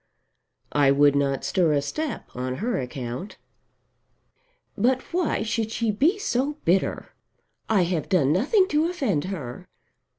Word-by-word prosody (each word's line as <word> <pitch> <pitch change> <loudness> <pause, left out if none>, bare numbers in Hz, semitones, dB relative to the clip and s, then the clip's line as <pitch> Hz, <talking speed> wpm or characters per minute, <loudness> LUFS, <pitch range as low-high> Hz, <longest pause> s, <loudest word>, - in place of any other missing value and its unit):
"I 145 -2 +4
would 145 +1 +5
not 140 -1 0
stir 170 -5 +2
a 145 - +2
step 300 - -4
on 130 +1 -3
her 230 - -1
account." 125 - -6 1.4
"But 255 +2 +2
why 345 -10 0
should 220 0 -1
she 225 0 0
be 305 - +2
so 290 - -1
bitter? 180 +3 0 0.6
I 205 -4 +4
have 170 -2 -2
done 155 -7 +3
nothing 335 - +3
to 310 +2 +2
offend 220 - -1
her. 150 -11 -6
190 Hz, 135 wpm, -25 LUFS, -, 1.4 s, would